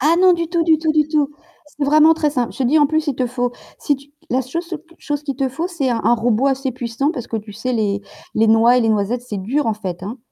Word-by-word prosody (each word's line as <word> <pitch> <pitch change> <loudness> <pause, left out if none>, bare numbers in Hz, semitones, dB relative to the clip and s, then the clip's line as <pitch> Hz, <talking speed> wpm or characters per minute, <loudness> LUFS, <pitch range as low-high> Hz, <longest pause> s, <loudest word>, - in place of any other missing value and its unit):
Ah 310 +5 +4
non, 370 -1 +6
du 335 -1 -2
tout, 335 -1 +1
du 320 -1 +4
tout, 315 0 0
du 305 -1 +2
tout. 300 -2 +1 0.4
C'est 295 0 -5
vraiment 305 +3 +6
très 310 -2 0
simple, 250 -5 -2
je - - -13
te 265 - +2
dis 285 +6 +3
en 290 - +6
plus 315 +1 0
il 280 - 0
te 255 - 0
faut 245 0 -2 0.3
si 290 - 0
tu 280 +1 -19 0.2
la 255 +2 +1
seul 265 +7 -4
so 340 -2 -6
q 335 +2 -23
chose 290 -1 -3
qu'il 280 -2 -3
te 265 0 -1
faut, 320 +7 -3
c'est 335 -8 -2
un 235 -2 0
un 240 - +4
robot 235 +2 +1
assez 270 0 -1
puissant 250 +4 -2
parce 245 -6 -6
que - - -4
tu 210 0 -9
sais, 235 +5 -3
les 205 -3 0 0.3
les 220 +1 +3
noix 230 +3 +5
et - - +3
les 225 - +2
noisettes 215 +3 0
c'est 210 - -4
dur, 275 +9 0
en 225 - +1
fait, 185 -4 -6
hein. 215 +6 -6
265 Hz, 295 wpm, -19 LUFS, 230-305 Hz, 0.4 s, non